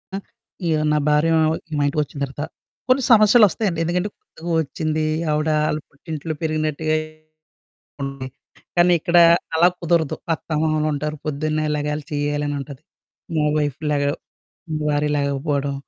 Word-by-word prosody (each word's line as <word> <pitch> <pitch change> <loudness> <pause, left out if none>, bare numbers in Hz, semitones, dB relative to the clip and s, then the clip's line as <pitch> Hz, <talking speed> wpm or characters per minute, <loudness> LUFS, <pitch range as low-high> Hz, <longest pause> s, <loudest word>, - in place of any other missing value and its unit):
ఆహ్, 195 - -5 0.5
య్ 160 - +3 0.2
నా 150 - +3
భార్యా 150 +2 +3 0.5
మా - - +2
ఇంటికొచ్చిన 145 0 -2
తర్వాత, 140 +2 -6 0.5
కొన్ని 260 0 +4
సమస్యలొస్తయండి. 210 -4 +5
ఎందుకంటే, 180 +4 -1
కొత్తగా 170 +2 -10
ఒచ్చిందీ. 155 +1 -2 0.3
ఆవిడా 155 +1 +1
ఆళ్ళ 155 - -1
పుట్టింట్లో 155 +2 -6
పెరిగినట్టుగే 155 0 0 1.1
ఉంది. 135 -1 -5 0.5
కానీ 175 0 +5
ఇక్కడా 170 +1 +5 0.3
అలాగ 175 +3 +5
కుదరదు. 165 -3 +1 0.2
అత్తామామలుంటారు, 155 -1 -1
పొద్దున్నే 155 +1 -1
లెగాలి, 150 0 -2
చెయ్యాలనుంటది. 145 -1 -2 0.5
మా 150 - +2
వైఫ్ 145 -3 -2
లెగ 145 -1 +1 0.8
భార్య 150 0 +1
లెగకపోడం, 140 0 -1
155 Hz, 115 wpm, -21 LUFS, 145-165 Hz, 1.1 s, సమస్యలొస్తయండి